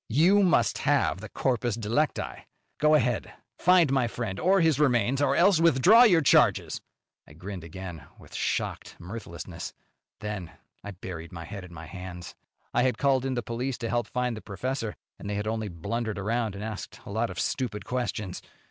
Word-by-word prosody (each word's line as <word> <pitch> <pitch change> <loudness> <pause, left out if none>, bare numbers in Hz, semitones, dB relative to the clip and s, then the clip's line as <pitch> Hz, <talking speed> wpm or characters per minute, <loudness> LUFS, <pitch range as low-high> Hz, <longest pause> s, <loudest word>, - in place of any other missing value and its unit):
"You 170 - +5
must 180 -5 +3
have 100 - +1
the 110 - -8
corpus 120 -3 0
delicti. 120 +7 -1 0.3
Go 150 0 +5
ahead! 125 -5 0 0.3
Find 180 -5 +5
my 130 -3 +2
friend 115 -5 -4
or 190 +3 +4
his 160 -5 +3
remains, 130 -2 +2
or 140 -1 +3
else 180 -2 +5
withdraw 170 - +7
your 175 -8 +5
charges." 140 - +3 0.5
I - - -14
grinned 90 +2 -7
again, 85 -3 -8
with - - -16
shocked - - -2
mirthlessness. 100 +6 -7 0.4
Then 105 -5 -5 0.3
I 105 - -6
buried 85 -4 -8
my 85 -2 -7
head 100 +2 -7
in 90 - -11
my 80 -1 -9
hands. 90 0 -8 0.4
I - - +3
had 130 0 +2
called 135 -2 +2
in 130 -1 -1
the 120 - -2
police 120 +3 -3
to 115 - -4
help 120 -2 0
find 125 -1 -1
the 110 - -8
professor, 115 +2 -3 0.2
and 100 - -6
they 105 - -2
had 105 +1 -2
only 110 0 -2
blundered 105 +5 -3
around 110 +1 -1
and 100 - -6
asked 110 -2 -6
a - - -8
lot 110 +3 0
of - - -6
stupid 120 -6 -2
questions. 115 -6 -3
115 Hz, 185 wpm, -27 LUFS, 100-135 Hz, 0.5 s, withdraw